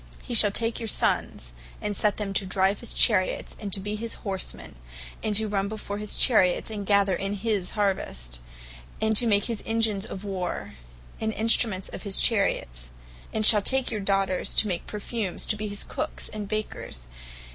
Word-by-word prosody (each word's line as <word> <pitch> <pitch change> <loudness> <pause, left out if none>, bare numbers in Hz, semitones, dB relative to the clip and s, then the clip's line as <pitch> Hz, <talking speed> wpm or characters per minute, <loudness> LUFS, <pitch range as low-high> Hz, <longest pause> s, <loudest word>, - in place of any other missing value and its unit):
He 250 - -6
shall 215 -2 +6
take 230 +3 -1
your 230 - -4
sons, - - 0 0.3
and 210 -1 -3
set 210 0 +1
them 205 -2 -3
to 195 - 0
drive 190 +1 +1
his 235 - -3
Chariots, 185 -6 +2
and 205 -2 -5
to 195 - -1
be 205 +2 -4
his 225 +2 0
horsemen, 190 -2 -4 0.5
and 215 -1 -1
to 220 +1 +4
run 200 -1 -1
before 205 -1 -5
his 210 -1 +1
chariots; 200 -4 +4
and 205 -2 -5
gather 200 -2 +3
in 195 +3 -3
his 205 -3 -2
harvest; 60 - -2 0.6
and 220 0 +1
to 235 +3 +4
make 205 -2 +3
his 230 -3 -3
engines 225 -3 0
of 190 - -7
War, 190 -3 -4 0.5
and 220 - -1
Instruments 220 -3 +2
of - - -8
his 200 -2 +1
chariots; - - +1 0.4
and 215 -1 +1
shall 210 -1 +7
take 265 +4 +1
your 215 - -2
daughters 195 -2 0
to 215 - +4
make 175 -3 -3
perfumes, 210 -2 -3
to 215 - +1
be 215 0 -4
his 205 0 -4
Cookes, - - -4
and 210 -1 -6
Bakers. 210 - -5
205 Hz, 185 wpm, -26 LUFS, 195-220 Hz, 0.6 s, shall